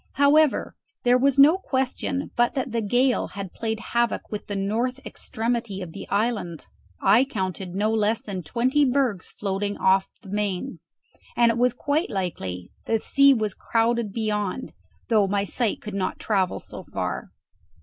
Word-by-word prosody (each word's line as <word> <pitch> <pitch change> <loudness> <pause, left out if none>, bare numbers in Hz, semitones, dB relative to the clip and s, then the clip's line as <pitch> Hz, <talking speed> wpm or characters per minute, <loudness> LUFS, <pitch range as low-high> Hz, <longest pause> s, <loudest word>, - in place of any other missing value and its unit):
However, 285 +1 +3 0.3
there 245 +1 +4
was 275 +1 +2
no 305 +7 +7
question 265 -2 -2
but 240 +4 +2
that 265 -2 -2
the 230 0 0
gale 245 +5 +2
had 195 -2 -7
played 220 -1 -3
havoc 235 -1 0
with 210 - -5
the 205 - -3
north 225 +7 -1
extremity 230 -3 -3
of 180 -3 -6
the - - -8
island: 205 -6 -1 0.3
I 210 +6 +5
counted 190 -7 -4
no 210 +2 +1
less 220 0 +2
than 195 -3 -5
twenty 255 - +1
bergs 255 -7 +1
floating 200 0 -3
off 190 0 +3 0.2
the 195 - -11
main, 205 +4 -2 0.6
and 235 -1 +5
it 230 - -3
was 250 -1 +3
quite 290 +6 0
likely 95 - -4
the 225 - +1
sea 275 +5 +5
was 215 -4 -1
crowded 230 0 0
beyond, 210 +1 -2 0.3
though 215 -4 +3
my 200 +1 +1
sight 220 +2 -1
could 210 - -6
not 195 -1 -2
travel 190 -4 0
so - - -9
far. - - -4
220 Hz, 160 wpm, -25 LUFS, 200-250 Hz, 0.6 s, no